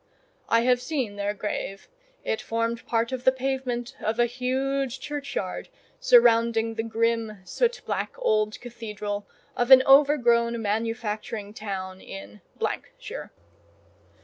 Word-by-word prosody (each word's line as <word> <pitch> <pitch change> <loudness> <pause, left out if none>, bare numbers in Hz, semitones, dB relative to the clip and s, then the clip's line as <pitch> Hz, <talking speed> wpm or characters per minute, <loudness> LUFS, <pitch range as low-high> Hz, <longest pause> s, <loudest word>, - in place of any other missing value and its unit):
(I 230 - +4
have 250 0 +3
seen 255 -9 -2
their 205 +1 -2
grave; 195 -1 -4 0.4
it 220 - -1
formed 230 0 -2
part 230 +1 +1
of 255 -1 -4
the 260 - +6
pavement 260 -1 -3
of 220 +1 0
a 240 - +4
huge 265 +2 -1
churchyard 275 -10 -4 0.3
surrounding 230 - +5
the 225 - -2
grim, 230 -1 0
soot 485 - 0
black - - -2
old 215 - +1
cathedral 210 -4 -5 0.3
of 245 +1 0
an 260 -1 +10
overgrown 240 -5 +5
manufacturing 215 -1 -3
town 190 -3 -5
in 100 +1 -10 0.3
——shire.) - - -8
230 Hz, 120 wpm, -26 LUFS, 215-260 Hz, 0.4 s, an